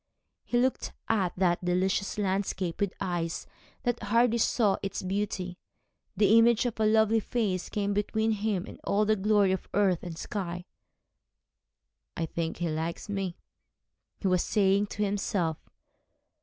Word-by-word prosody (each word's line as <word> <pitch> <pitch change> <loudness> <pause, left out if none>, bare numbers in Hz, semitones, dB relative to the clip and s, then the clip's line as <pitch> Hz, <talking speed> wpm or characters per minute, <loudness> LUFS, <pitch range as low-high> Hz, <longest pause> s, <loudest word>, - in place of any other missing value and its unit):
He 240 - -1
looked 255 +2 0
at 195 -6 +1
that 180 -1 +2
delicious 185 +3 0
landscape 190 -2 -1
with 200 -2 0
eyes 175 -3 -2 0.4
that 245 -1 -1
hardly 235 +2 +3
saw 215 -3 +2
its 195 -1 -4
beauty. 185 -2 -3 0.6
The 210 +3 +6
image 235 +1 +4
of 235 -2 -3
a 215 - +3
lovely 220 +1 +4
face 205 -5 -1
came 205 -1 -1
between 220 +2 0
him 205 -3 -1
and - - -11
all 210 +1 +2
the 215 +1 +3
glory 205 -1 +3
of 190 - -3
earth 195 -4 +3
and 170 -2 -7
sky. 180 -2 -4 1.5
'I 165 - 0
think 165 0 -3
she 175 - -1
likes 160 +5 -3
me,' 195 -3 -3 0.8
he 195 - -2
was 185 -1 +3
saying 200 0 +2
to 210 - -3
himself. 195 -5 -1
200 Hz, 145 wpm, -29 LUFS, 180-215 Hz, 1.5 s, The